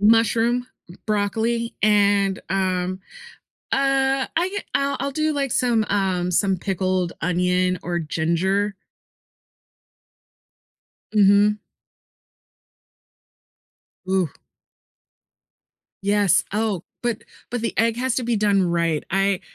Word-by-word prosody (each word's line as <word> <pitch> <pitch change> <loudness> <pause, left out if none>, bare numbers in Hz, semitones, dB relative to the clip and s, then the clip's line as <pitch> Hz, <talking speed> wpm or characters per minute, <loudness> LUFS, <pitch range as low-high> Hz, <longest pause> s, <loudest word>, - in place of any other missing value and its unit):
mushroom, 230 +3 +3 0.2
b 175 - -13
broccoli, 220 +3 -1
and, 200 -2 +3
um, 185 -1 -1 0.7
uh, 270 0 +2
I 350 +3 +1
get 405 +1 -5
I'll 280 0 0
I'll 275 +1 -2
do 310 +2 0
like 275 -4 -1
some, 235 -4 +2
um, 185 -3 0
some 190 +1 +2
pickled 185 -1 -1
onion 180 +1 +1
or 175 0 -2
ginger. 175 +6 0 2.4
Mhm. 205 +1 +4 2.5
Ooh. 190 -3 +1 1.7
Yes. 200 -2 +3
Oh, 210 -4 -1 0.2
but, 240 -3 -1 0.3
but 245 -1 -2
the 230 - -2
egg 230 0 +2
has 255 0 -1
to 250 - -1
be 235 -1 0
done 205 -2 +2
right. 170 -3 0
I 195 0 +1
205 Hz, 100 wpm, -22 LUFS, 185-230 Hz, 2.5 s, Mhm